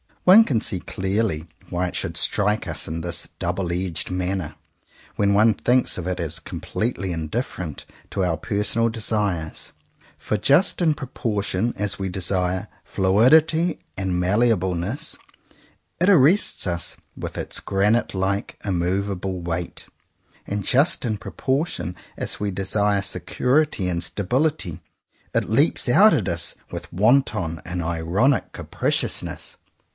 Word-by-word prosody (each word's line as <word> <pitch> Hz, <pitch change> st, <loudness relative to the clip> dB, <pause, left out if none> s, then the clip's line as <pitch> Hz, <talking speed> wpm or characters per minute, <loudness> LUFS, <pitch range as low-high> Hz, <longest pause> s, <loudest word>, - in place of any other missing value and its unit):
One 195 Hz, +5 st, +9 dB
can 120 Hz, -, +1 dB
see 95 Hz, -4 st, 0 dB
clearly 95 Hz, -3 st, -2 dB, 0.2 s
why 90 Hz, +1 st, -1 dB
it -, -, -6 dB
should -, -, -2 dB
strike 105 Hz, -1 st, +2 dB
us 80 Hz, -, -2 dB
in 80 Hz, +1 st, -4 dB
this 85 Hz, 0 st, -1 dB
double 90 Hz, -3 st, -2 dB
edged 90 Hz, -1 st, -2 dB
manner 90 Hz, -3 st, -2 dB, 0.6 s
when 100 Hz, -1 st, +2 dB
one 110 Hz, +2 st, +5 dB
thinks 125 Hz, +5 st, +2 dB
of 90 Hz, -1 st, -4 dB
it 90 Hz, 0 st, -2 dB
as 85 Hz, -1 st, -1 dB
completely 100 Hz, +3 st, -3 dB
indifferent 85 Hz, -, -4 dB, 0.3 s
to 95 Hz, -, -1 dB
our 85 Hz, -3 st, 0 dB
personal 105 Hz, +3 st, 0 dB
desires; 105 Hz, -7 st, -2 dB, 0.4 s
for 105 Hz, -, -2 dB
just 145 Hz, -, +3 dB
in 160 Hz, -3 st, +4 dB
proportion 115 Hz, -5 st, -2 dB
as 100 Hz, -2 st, -2 dB
we 95 Hz, -1 st, -2 dB
desire 90 Hz, 0 st, 0 dB, 0.2 s
fluidity 155 Hz, -, +3 dB, 0.2 s
and 95 Hz, -2 st, -1 dB
malleableness, 95 Hz, -, +1 dB, 0.8 s
it 180 Hz, +3 st, +3 dB
arrests 180 Hz, +2 st, +4 dB
us 85 Hz, -2 st, -2 dB, 0.2 s
with -, -, -6 dB
its -, -, -2 dB
granite 105 Hz, +3 st, +1 dB
like 95 Hz, +2 st, -1 dB
immovable 95 Hz, 0 st, -1 dB
weight; 85 Hz, 0 st, -4 dB, 0.6 s
and 100 Hz, 0 st, -2 dB
just 140 Hz, +6 st, +3 dB
in 110 Hz, -3 st, -1 dB
proportion 130 Hz, -, -2 dB, 0.2 s
as -, -, -4 dB
we 105 Hz, -, -1 dB
desire 100 Hz, +1 st, +1 dB
security 115 Hz, -, +1 dB
and 85 Hz, -1 st, -1 dB
stability, 120 Hz, -, -1 dB, 0.5 s
it -, -, +1 dB
leaps 140 Hz, +8 st, +2 dB
out 200 Hz, -, +7 dB
at 110 Hz, -11 st, 0 dB
us 85 Hz, 0 st, 0 dB, 0.2 s
with -, -, -7 dB
wanton 95 Hz, -5 st, +2 dB
and 90 Hz, -1 st, -3 dB
ironic 85 Hz, -, +1 dB
capriciousness. -, -, -3 dB
100 Hz, 130 wpm, -23 LUFS, 90-120 Hz, 0.8 s, One